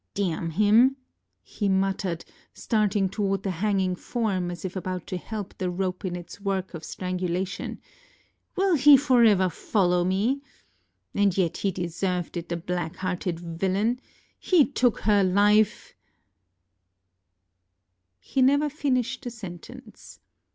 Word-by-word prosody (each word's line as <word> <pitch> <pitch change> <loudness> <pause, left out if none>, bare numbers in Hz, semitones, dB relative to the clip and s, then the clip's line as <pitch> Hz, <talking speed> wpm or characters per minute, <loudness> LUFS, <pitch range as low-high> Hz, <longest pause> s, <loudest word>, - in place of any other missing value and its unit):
ŌĆ£Damn 165 -4 -2
him! 215 +7 +5
ŌĆØ 270 - -14 0.5
he 205 -2 -3
muttered, 190 -2 0 0.3
starting 210 -3 +1
toward 195 -1 -1
the 195 - -1
hanging 190 0 0
form, 195 -4 -2
as 175 +1 -7
if 185 - -5
about 185 -2 -4
to 190 - -5
help 205 +2 -6
the 185 - -1
rope 180 0 -3
in 180 -2 -3
its 175 +3 -9
work 195 -2 -2
of 165 -2 -7
strangulation; 185 +2 -3 0.8
ŌĆ£will 375 -5 +3
he 285 +1 +9
forever 235 -8 +4
follow 180 0 +1
me? 205 +10 0 0.7
And 200 -2 +2
yet 175 -3 +1
he 200 - 0
deserved 180 0 -3
it, 170 0 -5
the 170 - -2
black 175 -1 -3
hearted 180 -2 -3
villain! 190 +8 -1 0.4
He 345 -7 +4
took 250 -4 +1
her 205 -2 +3
life 205 +3 +3 2.3
ŌĆØ - - -31
He 265 - 0
never 285 +3 +4
finished 265 -3 -1
the 245 - -4
sentence. 190 -8 -11
195 Hz, 135 wpm, -26 LUFS, 180-220 Hz, 2.3 s, he